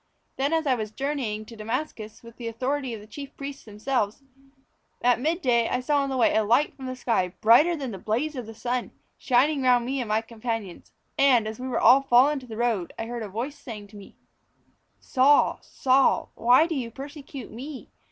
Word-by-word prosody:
"Then 275 +3 0
as 325 -1 +1
I 270 - +3
was 215 -3 -3
journeying 240 -4 -3
to 230 - -12
Damascus, 220 -1 -5
with 230 -1 -14
the 235 - -6
authority 255 +2 -2
of 210 - -10
the - - -13
chief 275 +6 -10
priests 275 0 -7
themselves, 215 +2 -2 0.8
at 245 -1 +4
mid 325 +6 -1
day 235 -2 +2
I 250 - 0
saw 285 +3 +1
on 275 - -2
the 265 - -2
way 240 - +3
a 220 - +3
light 240 +8 +2
from 265 -1 -8
the 255 - -4
sky, 225 -8 -1
brighter 270 +11 +5
than 270 -6 -5
the 195 - -7
blaze 245 +11 -1
of 245 -4 -6
the 225 - -9
sun, 245 +2 -2 0.3
shining 275 +3 +2
round 250 -2 +4
about - - -6
me 265 +1 -2
and 235 - -5
my 215 +1 +2
companions. 225 -4 -6 0.3
And, 250 -6 +5
as 220 +1 -6
we 255 - -5
were 255 - -1
all 255 +4 +7
fallen 260 +2 +5
on 295 - -2
to 255 - -14
the 220 -2 -8
road, 225 -7 -1
I 225 - -4
heard 240 0 -5
a 215 - -5
voice 255 +8 -5
saying 210 -7 -9
to 210 - -16
me: 200 -1 -13 0.8
"'Saul, 275 +2 +3
Saul, 265 +1 +2
why 250 +6 +5
do 335 - -3
you 255 -6 -3
persecute 275 0 -9
me? 265 +4 -9
245 Hz, 220 wpm, -26 LUFS, 225-275 Hz, 0.8 s, all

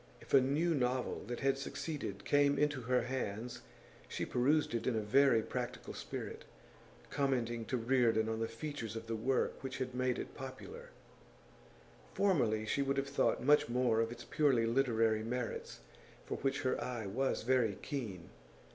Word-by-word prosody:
If - - -13
a 135 - +8
new 150 +6 +2
novel 125 -2 -1
that 120 - -4
had 135 0 +2
succeeded 135 - -5
came 145 0 +4
into 145 -3 +1
her 125 +1 +1
hands 120 -2 -4 0.5
she - - -3
perused 140 +3 +2
it 115 - -1
in 125 - +2
a 110 - 0
very 115 +1 +4
practical 125 +1 -4
spirit, - - -6 0.7
commenting 120 -5 0
to 125 - -1
Reardon 115 -2 +2
on 110 0 -2
the 115 - 0
features 115 -2 -5
of 115 0 -5
the 115 0 -2
work 125 +4 0
which 135 -1 -5
had 130 -1 -3
made 125 0 0
it - - -6
popular; 415 - -8 1.3
formerly, 120 - +2
she 140 - 0
would 140 0 0
have 135 0 -1
thought 140 - +1
much 145 -2 +5
more 120 -2 +2
of 115 0 -1
its 120 - -8
purely 135 -7 +2
literary 115 -3 +2
merits, 120 - -4 0.4
for - - -3
which 135 0 -1
her 130 - 0
eye 120 -4 -4
was 125 +7 -1
very 120 -4 +2
keen. 105 -12 -5
125 Hz, 165 wpm, -35 LUFS, 115-135 Hz, 1.3 s, a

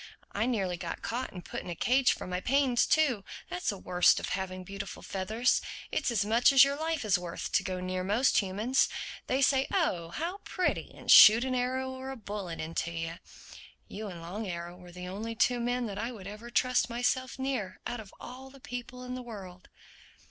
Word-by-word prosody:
I 215 +4 0
nearly 195 -8 0
got 170 -1 -6
caught 245 +3 -3
and 180 -2 -9
put - - -5
in - - -9
a 175 - -3
cage 255 +7 +3
for - - -7
my 180 0 -3
pains 265 -1 +3
too. 270 -10 +3 0.3
That's 180 0 -2
the 200 - -2
worst 180 -1 +4
of - - -4
having 185 -1 -3
beautiful 195 +1 -7
feathers: 220 +6 +1 0.3
it's - - 0
as 215 -4 +1
much 230 +5 +5
as 270 0 +9
your 275 0 +2
life 315 -3 -2
is 195 -4 +3
worth 175 -1 -5
to - - +3
go 185 -1 -3
near 185 0 -2
most 215 +8 +3
humans—They 235 +6 0
say, 270 -1 +3
'oh 180 - 0
how 340 - -4
pretty!' 370 -3 -2
and - - 0
shoot 225 +3 +10
an 260 - -1
arrow 260 +1 -1
or 260 0 -7
a 270 - -5
bullet 200 -7 -6
into 165 +1 -2
you. 165 0 -5 0.7
You 215 +1 -6
and 175 -4 -8
Long 200 +6 -5
Arrow 175 -1 -5
were 180 -1 -13
the 180 +1 -8
only 215 +5 -5
two 245 +2 +2
men 245 +1 0
that 200 -2 -5
I 230 +3 -2
would 210 -6 -10
ever 210 +4 -8
trust 250 -1 +2
myself 245 +2 -1
near—out 255 -3 -3
of 210 -3 -10
all 260 +2 -9
the 275 +1 -15
people 245 0 -7
in 250 0 -5
the 255 - -4
world." 195 -7 -10
220 Hz, 205 wpm, -30 LUFS, 185-255 Hz, 0.7 s, shoot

